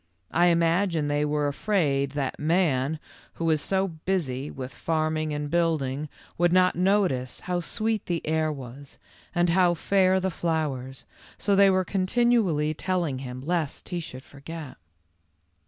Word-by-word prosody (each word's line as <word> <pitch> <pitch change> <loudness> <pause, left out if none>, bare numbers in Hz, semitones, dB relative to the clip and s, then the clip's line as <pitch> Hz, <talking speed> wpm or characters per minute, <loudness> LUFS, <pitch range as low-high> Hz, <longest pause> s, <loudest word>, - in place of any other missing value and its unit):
I 175 +1 +4
imagine 170 -2 +2
they 145 0 +1
were 150 0 0
afraid 140 -5 0
that 140 -2 -3
man, 155 -3 +1 0.3
who 165 - -3
is 155 -1 +2
so 190 +3 +1
busy 155 -6 -2
with 130 0 -7
farming 155 -1 -1
and 150 0 -3
building, 155 -3 0 0.3
would 175 0 +4
not 185 0 +4
notice 180 -10 +1
how 180 0 -1
sweet 215 +5 -1
the 170 -2 -2
air 155 0 +1
was 135 0 -9 0.4
and 175 0 +3
how 175 0 +4
fair 190 +2 +3
the 190 0 -1
flowers, 145 -6 -3 0.3
so 200 -1 +1
they 200 0 +6
were 185 -1 +2
continually 190 -6 +2
telling 170 -5 -1
him, 125 -1 -7
lest 160 0 -2
he 175 -2 -2
should 130 -5 -8
forget. 145 +1 -9
160 Hz, 145 wpm, -26 LUFS, 145-185 Hz, 0.4 s, they